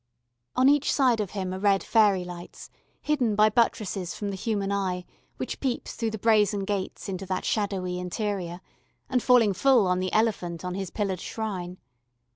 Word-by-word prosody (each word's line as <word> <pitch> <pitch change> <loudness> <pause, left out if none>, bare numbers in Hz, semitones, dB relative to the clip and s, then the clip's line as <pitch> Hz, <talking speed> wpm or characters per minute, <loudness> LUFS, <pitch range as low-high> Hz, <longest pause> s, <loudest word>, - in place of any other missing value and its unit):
On 255 - +4
each 290 0 +4
side 255 -5 +3
of 205 -3 -1
him 185 -1 -2
are 185 - -4
red 195 -1 +3
fairy 205 -5 +3
lights, 175 -1 -10 0.3
hidden 255 -8 +1
by 215 +1 +5
buttresses 205 -5 0
from 205 -1 -3
the - - -4
human 200 0 -2
eye 185 -3 -1 0.3
which - - -4
peeps 260 -3 -2
through 230 - -2
the 220 - -5
brazen 210 -2 +3
gates 200 +1 -3
into 190 0 -5
that 185 0 -2
shadowy 190 -4 -1
interior, 180 -1 -3 0.5
and 250 -2 +2
falling 235 -5 +5
full 245 +2 +4
on 180 0 +1
the 185 0 -2
elephant 185 -6 0
on 180 - -3
his 195 -1 -4
pillared 190 -3 -2
shrine. 185 -5 -4
200 Hz, 175 wpm, -26 LUFS, 185-220 Hz, 0.5 s, by